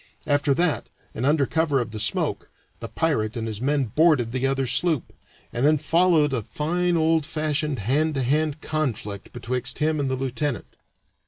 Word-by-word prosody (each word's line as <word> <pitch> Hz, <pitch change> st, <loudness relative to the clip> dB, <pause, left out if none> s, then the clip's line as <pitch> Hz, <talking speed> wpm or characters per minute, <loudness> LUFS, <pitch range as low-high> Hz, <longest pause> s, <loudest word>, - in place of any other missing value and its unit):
After 145 Hz, -1 st, +2 dB
that, 170 Hz, 0 st, 0 dB, 0.2 s
and 125 Hz, +4 st, -1 dB
under 145 Hz, -1 st, +3 dB
cover 160 Hz, -2 st, +1 dB
of 115 Hz, -3 st, -3 dB
the 110 Hz, -, -6 dB
smoke, 105 Hz, -, -1 dB, 0.3 s
the -, -, -6 dB
pirate 120 Hz, -9 st, -1 dB
and 115 Hz, -, -3 dB
his 110 Hz, -1 st, -5 dB
men 140 Hz, +1 st, +1 dB
boarded 150 Hz, -8 st, +4 dB
the 130 Hz, +1 st, 0 dB
other 135 Hz, 0 st, 0 dB
sloop, 155 Hz, +3 st, 0 dB, 0.4 s
and 120 Hz, +1 st, -1 dB
then 155 Hz, +2 st, +5 dB
followed 160 Hz, -1 st, +3 dB
a 125 Hz, -, 0 dB
fine 175 Hz, -, -1 dB
old 160 Hz, 0 st, +2 dB
fashioned 155 Hz, -1 st, -2 dB
hand 145 Hz, +9 st, 0 dB
to 135 Hz, -, 0 dB
hand 150 Hz, +3 st, 0 dB
conflict 115 Hz, -10 st, -3 dB
betwixt 125 Hz, +1 st, -3 dB
him 155 Hz, 0 st, +1 dB
and 140 Hz, -2 st, 0 dB
the 130 Hz, -, 0 dB
lieutenant. 135 Hz, 0 st, -3 dB
145 Hz, 175 wpm, -24 LUFS, 125-155 Hz, 0.4 s, then